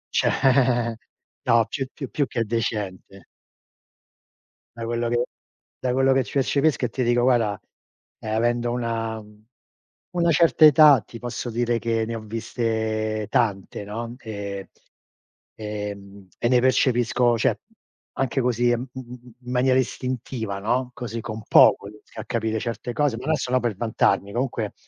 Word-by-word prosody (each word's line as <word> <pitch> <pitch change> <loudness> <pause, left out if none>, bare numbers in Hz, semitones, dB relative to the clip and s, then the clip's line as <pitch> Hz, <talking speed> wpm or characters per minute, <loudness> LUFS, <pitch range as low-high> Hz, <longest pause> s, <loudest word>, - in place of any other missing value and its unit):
C'è - - +3 1.2
no, 115 -2 +4
più 135 +2 -3
più 135 -4 -7
più 140 +6 -1
che 115 - -1
decente 105 -4 -4 1.5
Da 115 - -4
quello 120 0 -1
che 120 +1 +1 0.6
da 125 - -1
quello 135 +1 +3
che 130 -1 +2
percepisco 140 +1 +1
e - - -2
ti 125 +2 -2
dico, 120 0 +2
guarda, 115 -6 +2 0.6
ehm, 110 0 -3
avendo 120 +1 +1
una 115 -2 -2 0.9
una 170 -1 +3
certa 160 0 +5
età 150 -4 +8
ti 115 - -12
posso 120 0 -5
dire 120 0 0
che 115 -1 0
ne 115 +1 -4
ho 110 - -5
viste 110 -1 -2
tante, 100 -4 -1
no, 115 +4 -6
ehm, 100 -3 -6 0.9
ehm, 100 -2 -7
e - - +1
ne 125 -1 +5
percepisco, 120 -2 +2
cioè - - +1 0.5
anche 135 0 -1
così 120 -1 +1
in 120 -1 +2
m 130 - -8
m - - -5 0.4
m 125 0 -9
maniera 130 +1 +3
istintiva, 125 -5 -3
no, 125 +5 0
così 115 -3 -5
con 110 0 -6
poco 100 - +6
riesco 105 +1 -13
a - - -6
capire 110 -2 -1
certe 115 +1 -4
cose 145 -3 +1
non 130 +6 -5
è - - +4
solo 130 -2 0
per 120 -4 -2
vantarmi. 100 -2 +1
Comunque 120 -4 -2
115 Hz, 150 wpm, -24 LUFS, 110-125 Hz, 1.5 s, età